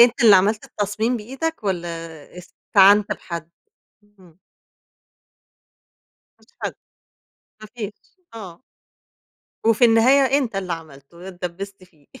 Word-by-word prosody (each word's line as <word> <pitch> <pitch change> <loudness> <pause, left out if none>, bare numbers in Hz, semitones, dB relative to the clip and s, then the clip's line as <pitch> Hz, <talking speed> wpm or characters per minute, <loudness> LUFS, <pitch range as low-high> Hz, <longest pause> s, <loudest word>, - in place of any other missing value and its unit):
أنت 240 0 +5
اللي 210 -3 +9
عملت 210 +3 +1
التصميم 215 +4 -2
بإيدك 265 +5 -5
والَّا 175 -3 -2 0.5
استعنت 200 +3 +3
بحد؟ 170 -1 -7 0.7
امم. 175 -2 -21 2.0
ما - - -25
فيش - - -32
حد، - - -3 0.9
ما 215 - -10
فيش، 210 -3 -6 0.4
آه. 195 -3 -10 1.0
وفي 230 +1 +4
النهاية 260 +4 +4
أنت 235 -7 -3
اللي 185 -3 -3
عملتُه، 165 +2 -10
اتدبست 185 +2 -7
فيه. 155 -6 -27
200 Hz, 110 wpm, -21 LUFS, 175-225 Hz, 2.0 s, اللي